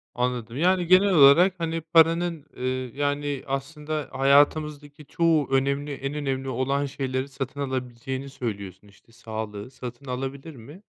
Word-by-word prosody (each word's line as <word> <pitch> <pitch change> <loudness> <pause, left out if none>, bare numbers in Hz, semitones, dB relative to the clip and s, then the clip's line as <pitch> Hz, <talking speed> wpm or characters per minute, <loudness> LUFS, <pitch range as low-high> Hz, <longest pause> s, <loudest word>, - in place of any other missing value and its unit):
Anladım. 125 -1 -2
Yani, 180 +1 +2
genel 185 +2 +5
olarak, 160 +5 +7
hani, 165 -1 -2
paranın, 165 0 +3
eee, 125 - -2 0.3
yani, 145 -1 -1
aslında 150 +2 -4
hayatımızdaki 145 +2 +2
çoğu 165 -3 +1
önemli, 140 +2 0
en 135 +1 -4
önemli 135 -2 -3
olan 135 +3 0
şeyleri 130 -1 -3
satın 135 +1 -6
alabileceğini 130 0 -4
söylüyorsun, 100 -6 -6
işte, 100 +3 -22
sağlığı 110 0 -7
satın 125 +1 -9
alabilir 135 +4 -5
mi? 145 - -13
140 Hz, 130 wpm, -25 LUFS, 130-150 Hz, 0.3 s, olarak